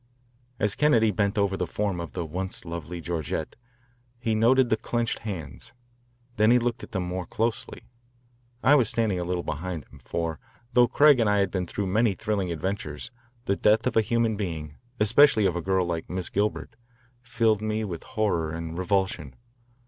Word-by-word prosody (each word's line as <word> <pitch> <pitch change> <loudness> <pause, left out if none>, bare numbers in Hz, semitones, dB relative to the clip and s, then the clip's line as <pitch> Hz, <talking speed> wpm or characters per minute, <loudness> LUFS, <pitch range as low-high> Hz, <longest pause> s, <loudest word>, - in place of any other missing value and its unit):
As 105 0 +1
Kennedy 115 -8 +3
bent 100 +2 0
over 100 -1 +2
the 90 -2 -2
form 100 0 -2
of 85 - -6
the 85 -2 -3
once 90 +4 -5
lovely 85 0 -6
Georgette, 80 -1 -3 0.6
he 115 -2 -1
noted 120 +3 +4
the - - +5
clenched 120 +1 -2
hands. 90 - -7 0.6
Then 110 +1 +4
he 125 - +6
looked 120 0 -1
at - - -10
them 95 -4 -2
more 90 0 -4
closely. 115 +1 -2 0.8
I 140 - +6
was 130 -7 +4
standing 110 -6 0
a - - -1
little 90 0 -2
behind 80 0 -4
him, 70 - -14
for 80 +4 -3 0.3
though 125 0 +6
Craig 145 -1 +5
and 110 -3 +3
I 105 - +3
had 100 -2 +1
been 90 -2 -2
through 100 +4 -3
many 105 +2 +2
thrilling 105 -4 -2
adventures, 85 - -4 0.3
the 100 - +1
death 105 +2 +3
of 125 - 0
a 110 - +6
human 115 0 +1
being, 80 -7 -4 0.3
especially 110 +1 +5
of 90 -3 +1
a 85 - -2
girl 95 +1 +1
like 85 -2 -4
Miss 90 -1 -3
Gilbert, 105 +2 -2 0.5
filled 115 -3 +1
me 110 0 -1
with 90 -6 -5
horror 100 -8 -1
and 85 +1 -5
revulsion. 95 -6 -1
100 Hz, 180 wpm, -26 LUFS, 85-110 Hz, 0.8 s, he